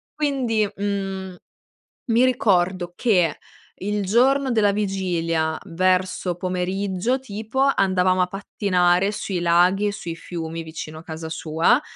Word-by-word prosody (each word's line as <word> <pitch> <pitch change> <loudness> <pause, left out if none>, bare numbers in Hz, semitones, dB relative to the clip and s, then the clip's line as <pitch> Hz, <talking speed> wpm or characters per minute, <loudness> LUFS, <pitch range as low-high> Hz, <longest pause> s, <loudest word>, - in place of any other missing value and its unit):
Quindi, 250 -8 0
mhmm, 195 -2 -3 0.8
mi 235 +2 +4
ricordo 185 -7 +1
che, 180 -10 +2 0.4
il 205 +1 -1
giorno 265 +6 +3
della 215 -3 +3
vigilia, 170 -6 -1
verso 185 +1 0
pomeriggio 185 +6 -1
tipo, 225 +1 -4
andavamo 185 -8 +3
a 180 - +2
pattinare 185 -1 +1
sui 195 -3 -3
laghi 180 +4 +3
e - - 0
sui 170 -4 -6
fiumi, 165 -1 -5
vicino 160 -1 -7
a - - -13
casa 160 -1 -7
sua. 165 - +2
185 Hz, 120 wpm, -23 LUFS, 175-210 Hz, 0.8 s, mi